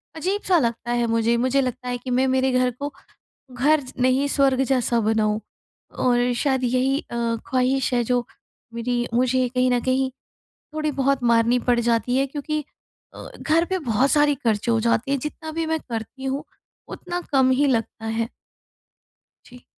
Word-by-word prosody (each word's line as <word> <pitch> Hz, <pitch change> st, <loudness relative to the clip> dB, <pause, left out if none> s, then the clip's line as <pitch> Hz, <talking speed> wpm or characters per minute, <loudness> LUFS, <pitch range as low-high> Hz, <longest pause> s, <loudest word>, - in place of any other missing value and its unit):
अजीब-सा 370 Hz, +2 st, +1 dB
लगता 235 Hz, -2 st, -2 dB
है 240 Hz, 0 st, +1 dB
मुझे। 230 Hz, +1 st, +2 dB
मुझे 260 Hz, +3 st, +2 dB
लगता 255 Hz, -1 st, -4 dB
है 245 Hz, -, -2 dB
कि 245 Hz, +1 st, -8 dB
मैं 255 Hz, +2 st, +2 dB
मेरे 260 Hz, 0 st, +2 dB
घर 255 Hz, 0 st, +2 dB
को 285 Hz, 0 st, -4 dB, 0.6 s
घर 290 Hz, +5 st, +3 dB
ज 260 Hz, -2 st, -11 dB
नहीं 255 Hz, +2 st, +3 dB
स्वर्ग 275 Hz, -2 st, +2 dB
जैसा 245 Hz, -3 st, +1 dB
बनाऊँ। 215 Hz, -1 st, +1 dB, 0.6 s
और 245 Hz, 0 st, +2 dB
शायद 265 Hz, -3 st, +1 dB
यही 255 Hz, +3 st, +1 dB
अ, 235 Hz, -, -9 dB, 0.3 s
ख्वाहिश 260 Hz, +1 st, +1 dB
है 240 Hz, -, +2 dB
जो 245 Hz, +1 st, 0 dB, 0.5 s
मेरी 240 Hz, +1 st, -1 dB
मुझे 255 Hz, +1 st, +2 dB
कहीं 255 Hz, +1 st, +1 dB
न 245 Hz, -1 st, +2 dB
कहीं 260 Hz, 0 st, +1 dB, 0.6 s
थोड़ी 305 Hz, -1 st, -1 dB
बहुत 275 Hz, -1 st, 0 dB
मारनी 235 Hz, +1 st, +3 dB
पड़ 240 Hz, -1 st, +4 dB
जाती 235 Hz, +1 st, +1 dB
है 270 Hz, -, +2 dB
क्योंकि 300 Hz, +2 st, -3 dB, 0.5 s
अ, -, -, -9 dB
घर 325 Hz, +2 st, +2 dB
पे 375 Hz, +1 st, -1 dB
बहुत 255 Hz, -2 st, +1 dB
सारी 295 Hz, -1 st, +4 dB
खर्चे 230 Hz, -2 st, 0 dB
हो 230 Hz, -, +2 dB
जाते 235 Hz, +3 st, +1 dB
हैं 280 Hz, -, +1 dB
जितना 310 Hz, +3 st, -6 dB
भी 325 Hz, +1 st, -2 dB
मैं 320 Hz, 0 st, -1 dB
करती 230 Hz, +3 st, -6 dB
हूँ 270 Hz, +3 st, -2 dB, 0.5 s
उतना 355 Hz, -1 st, -5 dB
कम 265 Hz, -1 st, +4 dB
ही 270 Hz, +3 st, +3 dB
लगता 225 Hz, -3 st, -1 dB
है। 225 Hz, +1 st, -2 dB, 1.2 s
जी। 250 Hz, 0 st, -15 dB
255 Hz, 175 wpm, -23 LUFS, 240-275 Hz, 1.2 s, पड़